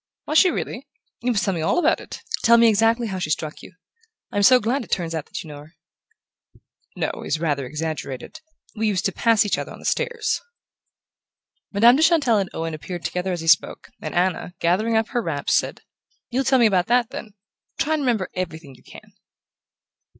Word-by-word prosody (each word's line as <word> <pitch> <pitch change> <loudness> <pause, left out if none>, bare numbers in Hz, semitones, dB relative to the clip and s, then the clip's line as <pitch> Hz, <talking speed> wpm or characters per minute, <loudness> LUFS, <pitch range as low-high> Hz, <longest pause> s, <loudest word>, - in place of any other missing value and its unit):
"Was 310 - +4
she 370 - +5
really? - - -4 0.3
You 250 - 0
must 210 -4 0
tell 195 - 0
me 165 - -3
all 160 - +1
about 350 - +3
it - - -10 0.2
tell 235 0 +6
me 230 0 +6
exactly 225 +2 +2
how 190 -4 -4
she 165 - -3
struck 155 0 -3
you. - - -13 0.6
I'm 205 - 0
so 250 +5 +7
glad 245 +4 -1
it - - -14
turns 170 -2 -1
out 160 -2 -4
that - - -6
you - - -12
know 145 -1 -9
her." 155 +3 -16 1.2
"'Know' - - -3
is 155 - -1
rather 145 -5 -1
exaggerated: 155 - -5 0.3
we 220 0 0
used 195 -3 0
to 195 - +2
pass 225 +3 +3
each 205 - 0
other - - -6
on - - -10
the - - -13
stairs." 470 -3 -1 1.3
Madame 235 +5 +6
de - - +1
Chantelle 310 -10 +4
and 190 -2 -2
Owen 165 0 -4
appeared 175 +3 -7
together 180 +1 -2
as 175 -2 -3
he 165 - -7
spoke, 170 +1 +2
and - - -5
Anna, 180 0 0
gathering 215 +7 +1
up 220 +1 0
her 240 - -1
wraps, - - -2
said: - - 0 0.5
"You'll 260 +2 0
tell 265 - +4
me 240 - +5
about 185 -4 +2
that, 245 -1 +2
then. 210 -2 -8 0.4
Try 315 - 0
and 310 - 0
remember 235 -8 0
everything 160 -6 -5
you 125 - -19
can." - - -15
200 Hz, 205 wpm, -22 LUFS, 165-235 Hz, 1.3 s, so